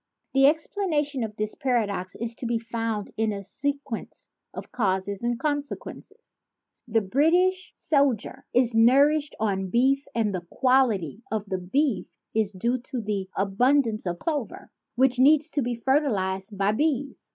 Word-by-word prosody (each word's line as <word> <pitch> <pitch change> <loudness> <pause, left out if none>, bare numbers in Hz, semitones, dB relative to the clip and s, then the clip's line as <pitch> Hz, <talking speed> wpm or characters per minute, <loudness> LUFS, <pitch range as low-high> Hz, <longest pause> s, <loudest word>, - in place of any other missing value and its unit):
The 270 0 +5
explana 315 +1 +1
tion 280 -4 -4
of 215 -2 -5
this 215 0 -3
paradox 210 -8 -1
is 230 +1 -4
to 245 - -4
be 235 0 +1
found 225 -2 -3
in 220 0 +1
a 200 -1 -5
sequence 280 +2 -5 0.2
of - - -9
causes 195 -3 -1
and 240 0 -1
consequences. 290 +1 -5 0.5
The 225 -1 +2
British 350 - +2
sol 280 -3 +2
dier 255 +5 -11
is 245 -1 +3
nourished 280 +6 +4
on 195 -3 0
beef 265 +6 +2
and 220 -3 +1
the 175 -2 -5
quality 235 - +1
of 215 -2 -2
the 190 -2 -3
beef 205 +1 -1 0.2
is 215 -2 +1
due 235 +6 -1
to 245 -1 -5
an 200 -3 -1
abundance 220 +2 +2
of 175 0 -2
clover, 290 - -4 0.2
which 255 0 +3
needs 300 +3 +5
to 290 - 0
be 245 -1 -2
fertilized 210 -7 0
by 200 +1 +2
bees. 280 +3 -1
235 Hz, 155 wpm, -25 LUFS, 205-280 Hz, 0.5 s, The